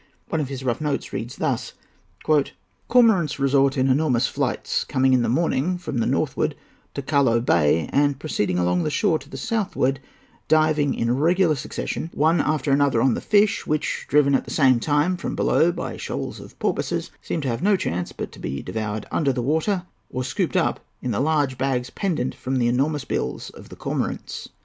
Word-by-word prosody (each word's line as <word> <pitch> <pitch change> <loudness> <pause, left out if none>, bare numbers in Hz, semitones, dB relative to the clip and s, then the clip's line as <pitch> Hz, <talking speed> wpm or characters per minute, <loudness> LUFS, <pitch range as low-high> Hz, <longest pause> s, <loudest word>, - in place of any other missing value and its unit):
One 160 - 0
of 145 - -2
his 135 -1 -6
rough 125 +2 -1
notes 150 -2 -2
runs - - -4
thus:—"Cormorants 170 - 0
resort 140 0 +2
in 130 0 +2
enormous 130 -3 +1
nights, - - -1
coming 130 0 +2
in 125 - +4
the 120 - 0
morning 165 +5 +1
from 145 -8 -4
the 115 - +1
northward - - 0 0.4
to 140 - -3
Callao 135 -5 +3
Bay, 80 - +2
and 145 -1 +3
proceeding 105 - -1
along 90 +7 +1
shore 160 0 +1
to - - -15
the 135 - -7
southward, 135 - -1 0.5
diving 155 -2 +3
in 115 +1 0
regular 170 +4 +3
succession 150 +3 -4
one 160 +4 +3
after 150 -2 0
another 140 -3 +3
on 130 +1 +3
the - - -3
fish 205 0 +2
which, 155 0 -1
driven 140 -1 +4
at 135 - +2
the - - -10
same 130 -5 +4
time 150 +7 +1
from - - -4
below 170 +2 +3
by 175 - -5
shoals - - -5
of - - -13
porpoises, - - -2
seem - - -3
to 140 - -3
have 115 +1 -2
no 200 +2 +4
chance 90 - -2
but - - -6
to - - -13
be 70 +2 -4
devoured 110 -1 -4
under 145 -4 +1
water 160 - 0 0.3
or 130 - -3
scooped 130 +1 -1
up - - +1 0.2
in 125 - -1
the 100 - -1
large 145 -3 +1
bags 130 -2 -1
pendent 160 -10 -1
from 130 +1 -4
the 120 -2 +2
enormous 135 +3 0
bills - - -3
of - - -14
the - - -10
cormorants." - - -4
140 Hz, 185 wpm, -23 LUFS, 125-155 Hz, 0.5 s, in